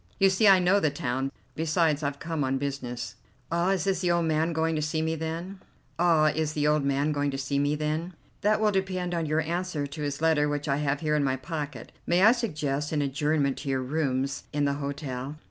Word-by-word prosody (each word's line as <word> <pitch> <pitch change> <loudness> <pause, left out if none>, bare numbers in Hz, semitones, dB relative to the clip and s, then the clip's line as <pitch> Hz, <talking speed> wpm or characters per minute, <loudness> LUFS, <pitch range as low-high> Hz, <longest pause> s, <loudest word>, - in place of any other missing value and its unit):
You 195 -1 +5
see, 200 +3 +3
I 195 -1 +8
know 185 +2 +3
the 155 - +2
town; 135 -1 -2 0.2
besides, 160 -1 +1
I've 140 -1 -2
come 160 -1 -2
on 135 0 0
business." 125 -4 -4 0.3
"Ah, 170 +2 +1
is 190 -1 0
the 180 - +1
old 170 -1 +2
man 160 +1 +1
going 160 0 0
to 155 - 0
see 155 +1 -1
me, 160 0 0
then?" 165 +4 -5 0.4
"That 160 -3 +4 2.3
will 215 -1 +3
depend 185 -2 -1
on 165 -2 -1
your 155 +1 +1
answer 170 -2 -2
to 145 +2 -7
his 145 -1 -2
letter 155 -2 +3
which 145 0 -2
I 140 -1 +1
have 145 -1 -1
here 150 -1 +1
in 150 - +2
my 130 -1 +1
pocket. 145 -2 -6 0.2
May 175 +2 +3
I 220 - +9
suggest 150 - -2
an 150 -2 +1
adjournment 140 0 0
to 140 - -5
your 130 -1 0
rooms 135 -1 -1
in 145 0 0
the 140 - +1
hotel?" 140 -1 -4
155 Hz, 185 wpm, -27 LUFS, 140-170 Hz, 2.3 s, I